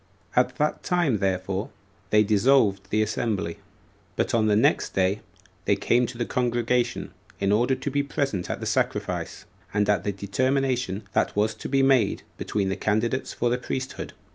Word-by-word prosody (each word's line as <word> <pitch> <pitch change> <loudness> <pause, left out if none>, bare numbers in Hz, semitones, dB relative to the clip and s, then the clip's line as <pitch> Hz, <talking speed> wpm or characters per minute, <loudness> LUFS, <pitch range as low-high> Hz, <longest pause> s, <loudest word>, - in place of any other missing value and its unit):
At 125 0 +3
that 150 +3 0
time 170 - +1
therefore 95 0 -1 0.4
they 105 0 +5
dissolved 105 -2 +3
the 110 +1 +2
assembly. 105 -5 -2 0.6
But - - 0
on 110 -2 +3
the 105 - +4
next 110 - +2
day 95 +2 +1 0.4
they - - +3
came 120 0 +2
to 120 - -8
the 120 - -1
congregation, 120 0 0 0.3
in 100 0 +1
order 120 +5 +3
to 135 +2 -4
be 145 +1 +2
present 140 - -2
at - - -3
the - - -5
sacrifice, - - -2 0.3
and 105 -1 +2
at 105 -1 +2
the 100 - 0
determination 125 +1 0
that - - +1
was 105 +2 +2
to - - -7
be 135 0 +3
made 135 -3 +3 0.2
between 100 -2 -1
the 95 - -1
candidates 115 +5 0
for 120 0 0
the 125 - 0
priesthood. 130 +1 -5
115 Hz, 170 wpm, -25 LUFS, 100-130 Hz, 0.6 s, they